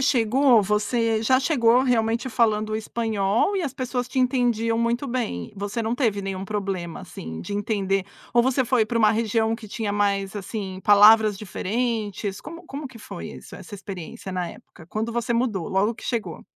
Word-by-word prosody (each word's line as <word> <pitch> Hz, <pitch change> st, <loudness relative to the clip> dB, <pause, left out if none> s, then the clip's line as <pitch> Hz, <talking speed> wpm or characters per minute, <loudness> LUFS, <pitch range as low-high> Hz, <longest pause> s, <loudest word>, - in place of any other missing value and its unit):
chegou, 255 Hz, -2 st, +4 dB
você 220 Hz, +2 st, +1 dB
já 260 Hz, +4 st, +3 dB
chegou 250 Hz, -4 st, +4 dB
realmente 235 Hz, -1 st, +1 dB
falando 215 Hz, -2 st, +1 dB
espanhol 220 Hz, -, 0 dB
e 370 Hz, -, 0 dB
as 275 Hz, -4 st, -3 dB
pessoas 250 Hz, -1 st, -2 dB
te 260 Hz, +1 st, -1 dB
entendiam 240 Hz, -3 st, +1 dB
muito 235 Hz, +3 st, 0 dB
bem, 235 Hz, -, -3 dB
você 205 Hz, +4 st, -3 dB
não 220 Hz, +1 st, -1 dB
teve 220 Hz, -7 st, 0 dB
nenhum 195 Hz, 0 st, -4 dB
problema, 195 Hz, -5 st, -3 dB
assim, 80 Hz, 0 st, -8 dB
de 205 Hz, -, -6 dB
entender? 195 Hz, -3 st, 0 dB, 0.3 s
Ou 240 Hz, -, +5 dB
você 260 Hz, +1 st, +2 dB
foi 235 Hz, -3 st, +2 dB
para 230 Hz, +1 st, -1 dB
uma 215 Hz, -2 st, +5 dB
região 225 Hz, 0 st, +1 dB
que 225 Hz, -2 st, -11 dB
tinha 205 Hz, 0 st, -3 dB
mais, 200 Hz, -1 st, 0 dB
assim, 190 Hz, -1 st, -5 dB
palavras 210 Hz, 0 st, +7 dB
diferentes, 210 Hz, 0 st, -3 dB
como 335 Hz, +1 st, -9 dB
como 280 Hz, +1 st, -6 dB
que 250 Hz, -3 st, -12 dB
foi -, -, -8 dB
isso, -, -, -11 dB
essa 205 Hz, -, -10 dB
experiência 190 Hz, -1 st, -8 dB
na 180 Hz, -2 st, -2 dB
época? 160 Hz, -3 st, -15 dB
Quando 220 Hz, +4 st, -3 dB
você 235 Hz, 0 st, -1 dB
mudou, 230 Hz, -7 st, 0 dB
logo 200 Hz, +3 st, +2 dB
que -, -, -12 dB
chegou? 230 Hz, -3 st, -3 dB
220 Hz, 175 wpm, -24 LUFS, 205-240 Hz, 0.3 s, palavras